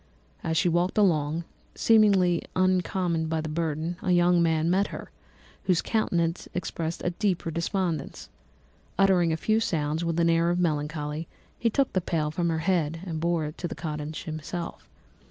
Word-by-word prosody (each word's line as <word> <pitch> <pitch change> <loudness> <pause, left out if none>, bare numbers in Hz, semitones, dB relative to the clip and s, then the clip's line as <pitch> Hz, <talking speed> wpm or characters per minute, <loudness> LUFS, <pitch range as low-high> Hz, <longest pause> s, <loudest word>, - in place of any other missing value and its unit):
As 160 0 0
she 180 - +3
walked 175 +3 +1
along, 165 -5 +2 0.3
seemingly 195 -6 +4
incommoded 180 -3 +1
by 160 0 0
the 155 - -3
burden, 160 +1 -2
a - - -2
young 175 0 +4
man 160 -1 +2
met 190 +4 +2
her, - - -8 0.5
whose 180 -3 +2
countenance 170 -6 0
expressed 165 -1 -3
a 175 - +1
deeper 180 -3 -1
despondence. 170 -2 -2 0.7
Uttering 185 -3 +4
a 160 - 0
few 215 +6 +2
sounds 160 -6 -1
with 165 0 -1
an 170 - +3
air 165 0 +3
of 175 - +1
melancholy, 150 -1 -2 0.3
he 230 - +2
took 275 +4 +1
the 185 - +1
pail 155 -3 -1
from 170 +2 0
her 165 - 0
head 165 -3 +1
and 165 -3 -4
bore 170 -1 0
it 150 +1 -7
to 175 - -2
the - - -6
cottage 155 -1 -5
himself. 165 +1 -6
170 Hz, 170 wpm, -27 LUFS, 160-180 Hz, 0.7 s, seemingly